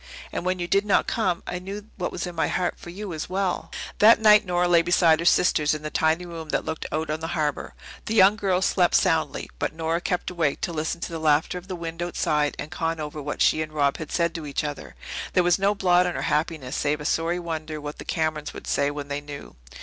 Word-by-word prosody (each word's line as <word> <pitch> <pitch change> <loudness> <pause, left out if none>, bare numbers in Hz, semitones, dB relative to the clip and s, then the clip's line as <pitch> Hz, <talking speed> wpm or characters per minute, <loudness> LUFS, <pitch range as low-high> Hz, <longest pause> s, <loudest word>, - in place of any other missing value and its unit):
And - - -3
when 185 0 +1
you 175 -1 -3
did 195 +2 +3
not 205 -2 +2
come 185 -7 -1
I 180 - -4
knew 200 +3 -7
what 180 - -3
was 180 - -4
in 180 - -6
my 165 - 0
heart 180 -1 -1
for - - -10
you 195 +1 -6
as 155 - -5
well." 190 0 -1 0.3
That 220 +2 +7
night 210 -2 +6
Nora 180 0 +2
lay 170 -1 +5
beside 170 -2 +4
her 170 - -3
sisters 155 -5 +3
in 150 - -7
the 155 - -4
tiny 160 +2 +1
room 165 -2 -8
that - - -1
looked 160 0 -4
out 155 0 -2
on 155 - -2
the 160 - -4
harbour. 150 -2 -2 0.3
The 220 - -1
younger 200 +1 +6
girls 185 0 +2
slept 180 -2 +3
soundly, 165 -5 +1
but - - -2
Nora 165 +1 -1
kept 180 0 -2
awake 165 -5 0
to 170 - -2
listen 160 +2 -3
to - - -4
the 165 - -4
laughter 155 +3 +2
of 180 - -17
the 185 - -4
wind 165 0 -6
outside, 150 -4 0
and 150 - -6
con 165 0 -2
over 150 0 -5
what 145 +1 -1
she 155 - +3
and 155 0 -5
Rob 140 -2 +1
had 155 - -7
said 170 -1 +1
to 160 -3 -6
each 140 - -2
other. 140 - -6 0.4
There 180 - +4
was 175 +2 +3
no 200 +1 +2
blot 180 -2 +3
on 175 - -3
her - - -3
happiness 150 -4 -1
save 150 +1 0
a 150 - -7
sorry 165 +3 0
wonder 160 -3 -4
what 150 0 -7
the - - -6
Camerons 155 -2 -2
would - - -9
say 140 0 +1
when 145 -1 -6
they 145 0 -3
knew. 145 -1 -9
165 Hz, 250 wpm, -25 LUFS, 155-180 Hz, 0.4 s, That